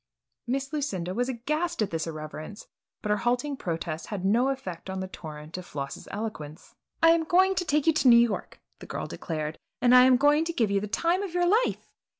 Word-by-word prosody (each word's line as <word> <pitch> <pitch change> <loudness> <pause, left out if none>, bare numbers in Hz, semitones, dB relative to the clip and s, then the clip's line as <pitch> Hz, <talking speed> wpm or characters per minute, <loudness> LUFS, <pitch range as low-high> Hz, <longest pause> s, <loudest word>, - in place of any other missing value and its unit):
Miss 270 +3 -2
Lucinda 190 - -2
was 245 +5 -1
aghast 305 +8 -2
at 200 - -4
this 165 0 -2
irreverence 155 +4 -7 0.4
but 210 - -1
her 210 - +3
halting 245 +6 0
protests 165 -3 -4
had 195 -3 -4
no 235 +7 +3
effect 190 -10 -5
on 190 0 -3
the 190 - -4
torrent 155 -1 -8
of 180 - -9
Floss's 140 -1 -6
eloquence. 185 -8 -6 0.3
"I 330 - +8
am 335 -1 +3
going 370 +4 +4
to 360 -1 -1
take 300 -3 +1
you 325 - +5
to 285 - +2
New 235 -1 +9
York," 235 -3 0 0.2
the - - -11
girl - - -4
declared 155 -1 -5 0.2
"and 245 0 +4
I 250 0 +9
am 255 -1 +6
going 290 +3 +4
to 335 - -3
give 225 -9 +1
you 200 - +2
the 210 - -4
time 340 - +1
of 380 -4 -5
your 355 0 +3
life! 435 +7 +1
235 Hz, 215 wpm, -27 LUFS, 180-300 Hz, 0.4 s, New